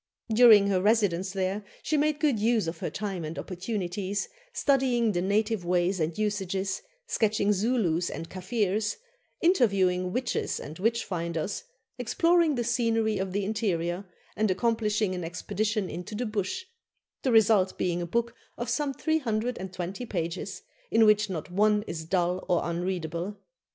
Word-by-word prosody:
During 220 -3 +8
her 185 -2 +2
residence 200 -3 +2
there 190 +1 -2 0.2
she 310 - 0
made 300 0 +2
good 290 -8 +2
use 225 -1 +2
of 165 0 -4
her - - -2
time 195 -4 -4
and 155 +1 -5
opportunities, 195 0 -3 0.2
studying 255 - +2
the 175 -3 0
native 210 +1 +1
ways 180 +2 +1
and 160 0 -1
usages, 195 -2 -1 0.2
sketching 215 - +2
Zulus 195 -5 +1
and 165 - -6
Kaffirs, 205 +2 -1 0.4
interviewing 195 - +3
witches 250 +4 -1
and 155 +3 -8
witch 225 +4 +1
finders, 170 0 -3 0.3
exploring 330 +5 +3
the 240 - 0
scenery 225 -3 +1
of 190 0 -2
the 200 +1 -1
interior, 195 -4 -1 0.3
and 215 -1 +1
accomplishing 210 0 +1
an 180 -1 -4
expedition 205 +4 -2
into 180 +6 -6
the 245 +4 -2
Bush, 215 - -2 0.6
the 260 - +1
result 215 -4 +4
being 175 -1 0
a 175 - -3
book 235 +5 0 0.2
of 240 -1 -3
some 275 +2 -1
320 220 - -2
pages, 170 -4 -4 0.3
in 225 - +5
which 210 -1 +4
not 175 -1 -5
one 210 +2 +3
is 160 -5 -5
dull 180 +1 0
or 175 - +3
unreadable. 175 +2 -3
205 Hz, 145 wpm, -28 LUFS, 180-225 Hz, 0.6 s, During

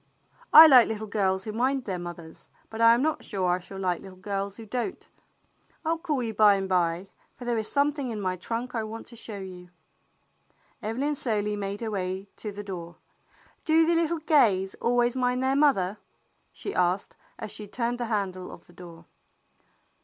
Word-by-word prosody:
" - - -28
I 315 - +12
like 260 -6 +8
little 220 -1 -4
girls 195 -3 0
who 215 - -5
mind 260 +3 0
their 185 -3 -3
mothers, 170 -2 -9 0.2
but 225 +1 -5
I 230 0 +7
am 245 - 0
not 315 0 -1
sure 190 -3 -2
I 180 - +1
shall 190 +2 -10
like 185 -2 -1
little 190 -1 -12
girls 200 +1 -4
who 225 - -9
don't. 245 - -4 0.8
I - - 0
'11 330 0 -1
call 300 -7 -1
you 225 -1 -3
by 210 -1 +6
and 195 -1 -2
by, 180 0 0 0.2
for 245 - -10
there 240 -2 0
is 215 - -3
something 285 -2 +1
in 220 -2 -4
my 185 -2 -1
trunk 230 +7 -4
I 225 -2 -1
want 220 +1 -7
to 235 - -12
show 220 -2 -7
you." 180 -2 -9 1.1
Evelyn 260 +8 -1
slowly 210 -6 -1
made 200 +1 -4
her 225 -1 -3
way 190 0 -3
to 210 - -4
the 205 +1 -7
door. 175 -4 -7 0.7
"Do 320 +1 +4
the 340 - +2
little 335 0 +1
Gays 235 - +3
always 240 +1 +2
mind 250 0 0
their 265 +1 +2
mother?" 215 -10 +2 0.5
she 400 - -6
asked, 180 +2 0 0.2
as 215 - -6
she 210 - -5
turned 240 +3 -2
the 240 - -1
handle 195 -4 -3
of - - -13
the 175 - -20
door. 170 -1 -12
215 Hz, 200 wpm, -27 LUFS, 190-250 Hz, 1.1 s, I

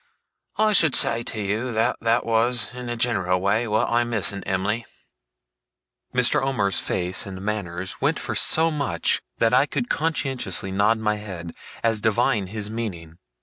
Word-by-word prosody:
I 215 0 +3
should 160 -7 +4
say 115 - +2
to 110 - -5
you, 105 +5 -2
that 110 +1 +1
that 115 +1 +1
was 120 +2 +1
in 125 -1 -7
a 120 - -2
general 95 -6 +1
way 105 +5 +1
what 110 0 +1
I 120 +1 +2
miss 115 -4 -1
in 100 - -6
Em'ly.' 100 +5 -1 1.3
Mr. 125 -1 +3
Omer's 125 -9 0
face 90 +2 0
and 95 -1 -7
manner 95 -3 -3
went - - +1
for - - -4
so 160 +1 +5
much, 140 - 0 0.2
that 115 +1 +2
I 135 +3 +4
could 240 - -3
conscientiously 135 - -1
nod 105 +4 +2
my 105 -1 -1
head, 90 -5 -7 0.3
as 115 -2 +2
divining 110 -1 +1
his 105 +1 -4
meaning. 90 -7 -6
110 Hz, 165 wpm, -23 LUFS, 95-120 Hz, 1.3 s, so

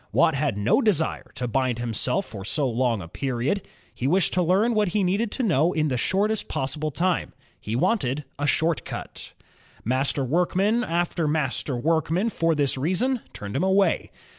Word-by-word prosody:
Watt 160 - +4
had 140 -6 -1
no 105 - +3
desire 190 - 0
to 125 - -3
bind 130 0 0
himself 120 - -1
for 100 -4 -8
so 140 +7 0
long 120 -4 0
a - - -9
period. 135 - -2 0.3
He 125 - -2
wished 180 +4 +2
to 185 - +2
learn 195 +7 +3
what 210 -2 +2
he 200 +3 0
needed 200 +5 +1
to 260 - -1
know 170 - +2
in 155 -1 +1
the 130 - 0
shortest 200 - 0
possible 145 +4 -2
time; 175 +4 -1 0.3
he 110 - -4
wanted 140 - +1 0.2
a 145 - 0
"short 160 +3 +1
cut.'' - - -7 0.5
Master 135 +3 +1
workman 185 - +1
after 170 -3 -1
master 145 -3 -1
workman 165 - +1
for 165 -3 +1
this 140 -2 +1
reason 220 - +1
turned 100 0 -7
him - - +1
away. 190 -2 +2
155 Hz, 175 wpm, -25 LUFS, 130-190 Hz, 0.5 s, Watt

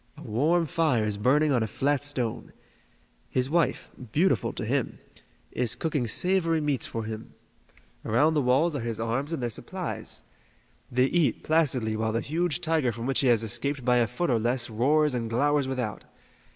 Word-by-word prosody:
A - - -10
warm 160 +10 +1
fire 150 -6 +1
is 105 -1 -1
burning 145 +8 +3
on 125 -4 +2
a 110 - 0
flat 140 +5 0
stone. 130 -6 -3 0.8
His 130 +2 -1
wife 170 -1 0 0.2
beautiful 150 - +2
to - - -4
him - - -1 0.5
is 120 -2 -1
cooking 150 -7 -1
savory 165 - +1
meats 145 -5 -1
for 115 - -4
him. 110 0 -7 0.7
Around 145 +9 +3
the 150 - +2
walls 140 +6 +2
are - - -1
his 115 -1 -3
arms 120 +7 -2
and 160 -7 -3
their 120 - -1
supplies. - - -5 0.7
They 125 +1 +3
eat 165 +2 +1
placidly 130 -9 +1
while 110 0 -1
the 115 - 0
huge 165 -1 -1
tiger 155 -6 +1
from 115 +1 -6
which 135 +1 +1
he 135 - +2
has 115 -2 +4
escaped 135 +4 -1
by 125 -1 +4
a 120 -1 +3
foot 130 +7 -1
or 115 - +2
less 120 +1 -1
roars 145 +6 +2
and 115 -2 -2
glowers 145 +4 +2
without. 125 -5 -3
130 Hz, 180 wpm, -27 LUFS, 115-150 Hz, 0.8 s, has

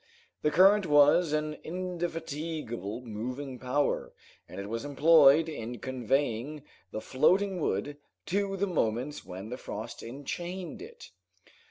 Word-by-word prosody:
The 150 - +2
current 190 +4 +5
was 145 +3 +5
an 150 0 -1
indefatigable 160 - -4
moving 125 +4 -5
power, 130 +4 0 0.4
and - - -8
it 100 - -5
was 115 +2 -3
employed 150 +1 +6
in 120 -6 -5
conveying 130 +3 -1 0.3
the 110 - -5
floating 185 +7 +2
wood 145 -1 -1 0.3
to 195 +1 -1
the 200 - +1
moment 140 - -1
when 95 +4 -8
the 125 - -5
frost 110 0 -7
enchained 175 - -6
it. 465 +3 -11
145 Hz, 125 wpm, -29 LUFS, 125-170 Hz, 0.4 s, employed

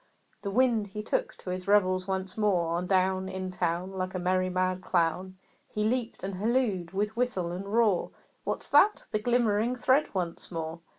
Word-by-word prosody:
The 200 - -3
Wind, 230 -1 +2
he 210 +2 -6
took - - -1
to 180 - -6
his 185 +1 -5
revels 185 -2 +3
once 190 -1 -3
more; 185 -6 +1
On 175 +1 -1
down 190 0 +1
In 185 -1 -4
town, 180 0 -1
Like 185 -1 -4
a - - +1
merry 185 +1 +1
mad 185 0 0
clown, 180 +2 0 0.3
He 210 - -2
leaped 235 -1 -1
and 195 +1 -3
hallooed 210 -5 0
with 205 +3 -1
whistle 235 -8 -1
and 195 +3 -5
roar, 215 -5 +3 0.3
"What's - - -2
that?" 420 - +5
The 215 - +1
glimmering 235 0 +2
thread 260 +4 +3
once 175 -3 -3
more! 165 -1 -4
190 Hz, 180 wpm, -29 LUFS, 185-215 Hz, 0.3 s, that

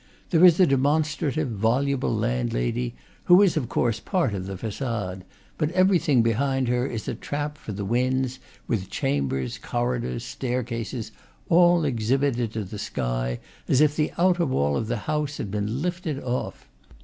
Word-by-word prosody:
There 170 -1 +4
is 175 -2 +7
a 185 - +7
demonstrative, 150 +1 +1
voluble 125 +6 +1
landlady, - - -1 0.3
who 180 +3 +7
is 190 - +3
of 135 -7 -1
course 115 -2 0
part 175 - 0
of 95 -1 -4
the 95 -1 -5
facade; 105 -4 -4 0.4
but 155 -2 +1
everything 180 -9 +4
behind 130 +3 +1
her 125 +1 +1
is 115 -5 -5
a - - -1
trap 145 +1 -4
for 130 - -8
the 100 0 -4
winds, 130 +3 0 0.3
with 95 -5 -2
chambers, 65 -2 -1
corridors, 120 -1 -2
staircases, 120 -2 -3 0.4
all 175 -1 +5
exhibited 125 -1 0
to 110 - -2
the 100 +2 -8
sky, - - -2 0.3
as 130 - +3
if 150 -1 +4
the 155 0 0
outer 175 -1 +3
wall 70 - +1
of 110 - -1
the 120 +1 -1
house 150 -1 -1
had 100 - -4
been 105 +7 -2
lifted 175 -5 -2
off. 125 0 -4
125 Hz, 160 wpm, -25 LUFS, 105-150 Hz, 0.4 s, is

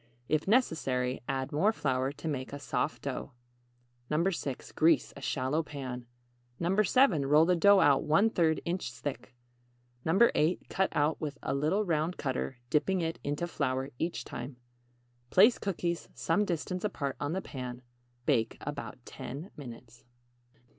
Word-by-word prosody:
If 155 +2 0
necessary, 135 - +1
add 135 0 -2
more 185 +9 +3
flour 130 - 0
to 155 - -7
make 130 -4 -3
a - - -3
soft 145 +1 -2
dough. 140 0 -4 0.8
6. 155 -4 -1
Grease 160 -1 +3
a 140 - -10
shallow 135 +3 0
pan. 130 -5 -6 0.5
7. 190 - +3
Roll 150 +3 +6
the 180 +1 +3
dough 200 +3 +6
out 140 -2 +5
1/3 165 -1 +3
inch 180 +2 -2
thick. 125 -3 -6 0.7
8. 175 -2 +3
Cut 190 0 +1
out 150 +2 +1
with 145 -2 -3
a - - -1
little 155 +10 +1
round 165 0 0
cutter, 130 -1 -2
dipping 180 +5 +2
it 165 0 -2
into 145 +4 -1
flour 130 -4 -2
each 165 +1 -2
time. 125 +2 -7 0.7
Place 215 +6 +6
cookies 175 -3 -2
some 185 +6 +1
distance 180 +1 -3
apart 140 -10 -2
on 145 +2 -2
the 190 - -1
pan. 125 -2 -6 0.4
Bake 115 -6 +1
about 145 -1 -5
10 150 +10 -7
minutes. 120 -4 -11
150 Hz, 140 wpm, -31 LUFS, 135-175 Hz, 0.8 s, Roll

